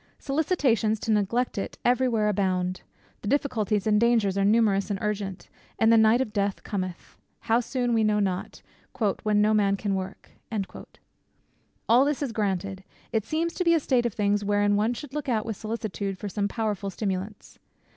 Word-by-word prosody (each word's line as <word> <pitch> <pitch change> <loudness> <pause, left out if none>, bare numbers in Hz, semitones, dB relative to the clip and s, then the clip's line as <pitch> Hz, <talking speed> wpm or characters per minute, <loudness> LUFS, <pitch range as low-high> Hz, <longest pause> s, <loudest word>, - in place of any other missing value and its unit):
Solicitations 275 - +1
to 225 - -1
neglect 215 +3 +1
it - - -5
every 250 +1 +3
where 220 -3 +1
abound: 185 -3 0 0.4
the - - -6
difficulties 220 -6 0
and 210 0 +3
dangers 230 -5 +3
are 200 - +1
numerous 205 -2 +3
and 200 - -1
urgent; 205 -3 -3 0.3
and 225 0 +4
the - - +7
night 220 +2 +5
of 215 -5 -3
death 200 -2 -1
cometh, 185 -4 -5 0.2
how 230 +1 +2
soon 245 0 -1
we 225 -1 +3
know 210 -1 +2
not, 190 -2 -3 0.6
"when 210 -1 +2
no 215 +1 +3
man 200 -2 +2
can 200 -1 -2
work." 190 0 -5 1.6
All 240 +3 +6
this 290 0 0
is 265 - -2
granted. 195 -3 -2 0.3
It 220 -2 0
seems 330 +2 -1
to 360 - -1
be 335 -1 +4
a - - +3
state 250 -4 +1
of 225 - -7
things 205 0 +1
wherein 205 0 +2
one 220 +4 +1
should 280 +1 -9
look 295 -2 -3
out 220 -3 0
with 225 -2 -3
solicitude 200 -3 -4
for 205 - -5
some 200 +1 -1
powerful 205 -2 -2
stimulants. 195 +1 -5
210 Hz, 180 wpm, -26 LUFS, 200-235 Hz, 1.6 s, the